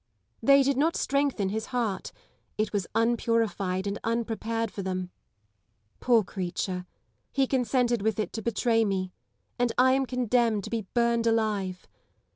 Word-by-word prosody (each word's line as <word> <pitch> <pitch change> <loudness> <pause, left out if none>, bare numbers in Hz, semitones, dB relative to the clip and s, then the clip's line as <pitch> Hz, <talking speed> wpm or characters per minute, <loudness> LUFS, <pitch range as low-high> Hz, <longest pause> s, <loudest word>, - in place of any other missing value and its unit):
They 275 +4 +6
did 275 0 +1
not 320 +4 +2
strengthen 275 -8 0
his 220 +2 -3
heart: 235 -6 -2 0.5
it 215 0 -1
was 200 -4 -1
unpurified 225 -5 +1
and 200 +1 -3
unprepared 230 -1 -1
for 200 - -5
them. 185 -1 -3 0.9
Poor 235 -3 +4
creature! 180 -1 -4 0.4
he 275 -1 +2
consented 250 -3 +1
with 220 -1 0
it 215 - -2
to 225 - -4
betray 225 +1 +2
me: 190 -3 -1 0.5
and 245 -1 +2
I 260 +1 +5
am 265 0 +2
condemned 240 -4 +1
to - - -7
be 225 -4 -2
burned 235 -1 +2
alive. 210 -5 0
225 Hz, 145 wpm, -27 LUFS, 200-245 Hz, 0.9 s, They